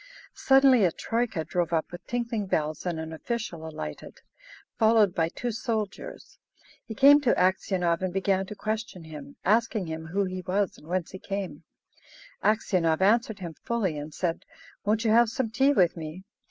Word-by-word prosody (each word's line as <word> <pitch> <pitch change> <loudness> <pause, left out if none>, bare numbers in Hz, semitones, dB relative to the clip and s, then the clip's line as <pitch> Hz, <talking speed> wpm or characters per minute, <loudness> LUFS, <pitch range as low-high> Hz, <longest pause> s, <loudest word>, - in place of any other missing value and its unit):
Suddenly 270 -4 +5
a 180 - +4
troika 225 -7 -2
drove 170 +1 -1
up 165 0 0
with 175 +1 -10
tinkling 235 -4 -2
bells 155 -1 -1
and 170 -2 -2
an 160 0 -6
official 170 -3 -4
alighted, 75 - -8 0.6
followed 220 -4 +4
by 165 -3 +1
two 240 +7 -4
soldiers. 220 -3 -5 0.5
He 220 - -6
came 285 +5 +7
to 250 -4 +3
Aksionov 180 -2 +1
and 185 -1 -1
began 190 0 0
to 210 - -7
question 215 -4 -4
him, 160 - -10
asking 220 -1 +2
him 160 0 -6
who 195 +5 0
he 185 0 -4
was 190 +1 -1
and 150 - -17
whence 180 0 -2
he 190 - -8
came. 185 -7 -5 0.8
Aksionov 185 -7 +2
answered 220 +2 +3
him 170 -2 -5
fully, 225 -9 -1
and 150 +1 -6
said, 170 +2 -2 0.4
"Won't 215 +2 +1
you 220 - +3
have 235 +1 +5
some 230 -1 -2
tea 265 +4 +3
with 185 -11 +3
me?" 165 +2 -7
190 Hz, 170 wpm, -27 LUFS, 170-225 Hz, 0.8 s, came